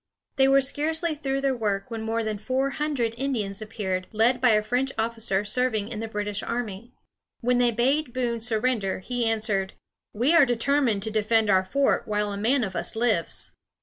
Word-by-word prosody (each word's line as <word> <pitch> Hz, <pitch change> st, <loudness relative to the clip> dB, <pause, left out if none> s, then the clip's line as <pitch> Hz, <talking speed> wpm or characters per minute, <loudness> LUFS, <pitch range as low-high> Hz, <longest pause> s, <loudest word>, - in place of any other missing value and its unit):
They 265 Hz, 0 st, +5 dB
were 275 Hz, 0 st, +5 dB
scarcely 320 Hz, +5 st, -1 dB
through 275 Hz, -2 st, -2 dB
their 270 Hz, -1 st, +1 dB
work 205 Hz, -2 st, -2 dB
when 225 Hz, -1 st, -4 dB
more 225 Hz, +1 st, -1 dB
than 215 Hz, -1 st, -3 dB
four 265 Hz, +5 st, 0 dB
hundred 280 Hz, -7 st, -1 dB
Indians 220 Hz, -8 st, -2 dB
appeared, 190 Hz, -4 st, -3 dB
led 235 Hz, +3 st, +2 dB
by 250 Hz, -, +5 dB
a 210 Hz, 0 st, +3 dB
French 250 Hz, +5 st, 0 dB
officer 225 Hz, -3 st, -1 dB
serving 220 Hz, -1 st, 0 dB
in 220 Hz, -, -5 dB
the 225 Hz, -, -3 dB
British 210 Hz, -1 st, -3 dB
army. 235 Hz, 0 st, -5 dB, 0.5 s
When 245 Hz, 0 st, +2 dB
they 245 Hz, -1 st, +4 dB
bade 255 Hz, +5 st, +1 dB
Boone 240 Hz, -2 st, -2 dB
surrender, 225 Hz, -3 st, 0 dB
he 240 Hz, +4 st, -2 dB
answered: 215 Hz, -4 st, 0 dB, 0.4 s
"We 245 Hz, +9 st, +2 dB
are 335 Hz, -3 st, +7 dB
determined 245 Hz, -3 st, +1 dB
to 220 Hz, -, -3 dB
defend 215 Hz, 0 st, +2 dB
our 190 Hz, 0 st, +4 dB
fort 275 Hz, +9 st, +1 dB
while 210 Hz, -1 st, -1 dB
a -, -, -3 dB
man 240 Hz, +5 st, +2 dB
of 190 Hz, -3 st, -4 dB
us 170 Hz, -, -3 dB
lives." 220 Hz, -7 st, 0 dB
230 Hz, 185 wpm, -26 LUFS, 210-255 Hz, 0.5 s, are